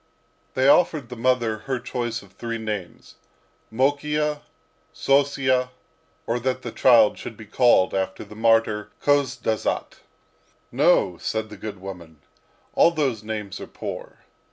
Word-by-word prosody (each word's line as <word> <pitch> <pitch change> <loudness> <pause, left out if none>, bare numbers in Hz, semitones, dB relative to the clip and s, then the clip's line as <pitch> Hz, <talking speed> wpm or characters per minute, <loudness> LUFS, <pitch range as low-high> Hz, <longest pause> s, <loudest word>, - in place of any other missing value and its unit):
They 130 +1 +3
offered 145 -4 +3
the 125 - -7
mother 120 -2 +1
her 130 - +1
choice 120 -2 -4
of 100 - -18
three 115 +4 -4
names, 105 -6 -6 0.5
Mokiya, 150 +4 0 0.5
Sossiya, 135 -2 +2 0.6
or 120 +1 -1
that 130 +1 -2
the 120 - -5
child 115 -5 +5
should 110 - -8
be 110 - -10
called 110 -3 +3
after 95 0 -2
the 105 0 -13
martyr 115 -1 +2
Khozdazat. 140 -6 0 0.7
"No," 90 -3 +3
said 110 0 -3
the - - -8
good 100 0 -7
woman, 90 -5 -10 0.5
"all - - +6
those 140 -10 -1
names 105 -3 -5
are - - -7
poor." - - -8
115 Hz, 130 wpm, -24 LUFS, 105-130 Hz, 0.7 s, all